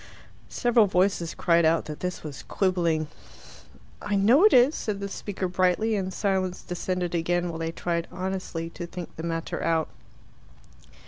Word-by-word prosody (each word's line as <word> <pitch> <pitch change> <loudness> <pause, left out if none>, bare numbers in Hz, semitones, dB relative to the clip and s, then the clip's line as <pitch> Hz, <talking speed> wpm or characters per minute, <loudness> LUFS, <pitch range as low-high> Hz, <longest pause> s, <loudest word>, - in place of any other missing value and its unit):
Several 240 -4 +3
voices 180 -2 +1
cried 170 -1 +3
out 160 +1 +3
that 150 -1 -7
this 180 0 -4
was 145 -3 -7
quibbling. 170 -5 0 0.9
"I 205 0 -1
know 230 - +5
it 425 - +7
is," 255 +4 +6
said 210 -8 -3
the 200 - -3
speaker 195 -1 -4
brightly, 185 +5 +1
and 190 -2 -2
silence 190 -2 -1
descended 180 0 -3
again, 175 +1 0
while 165 -1 -5
they 165 0 -2
tried 170 0 -2
honestly 180 -3 -4
to 170 0 -7
think 175 0 -8
the - - -6
matter 165 0 -3
out. 165 -1 +1
180 Hz, 155 wpm, -26 LUFS, 165-195 Hz, 0.9 s, it